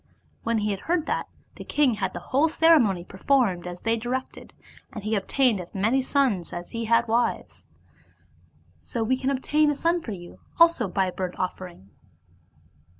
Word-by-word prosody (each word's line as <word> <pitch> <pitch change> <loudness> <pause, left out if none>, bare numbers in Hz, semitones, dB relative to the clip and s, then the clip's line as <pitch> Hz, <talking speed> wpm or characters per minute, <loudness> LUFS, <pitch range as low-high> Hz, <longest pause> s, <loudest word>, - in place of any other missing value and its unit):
When 230 0 0
he 210 -1 0
heard 325 - -1
that, - - -2 0.3
the - - -7
king 290 -4 +2
had 215 - -3
the - - -3
whole 295 +5 +4
ceremony 295 - +4
performed 190 -2 0
as 175 0 -7
they 225 0 +1
directed; 250 +3 -5 0.4
and 215 - -8
he 215 +1 -2
obtained 220 +1 +1
as 175 - -12
many 225 +7 +2
sons 255 - 0
as 175 0 -6
he 230 0 -3
had 230 +1 +3
wives. 235 +2 -1 1.1
So 230 - -4
we 250 +4 +1
can 260 +1 -2
obtain 295 +3 +2
a 295 - 0
son 335 +4 +1
for 225 - -6
you 175 -2 -11 0.2
also 335 -10 +5
by 190 +1 0
a 185 - -3
burnt 180 0 -5
offering." 180 - -6
230 Hz, 170 wpm, -25 LUFS, 190-270 Hz, 1.1 s, also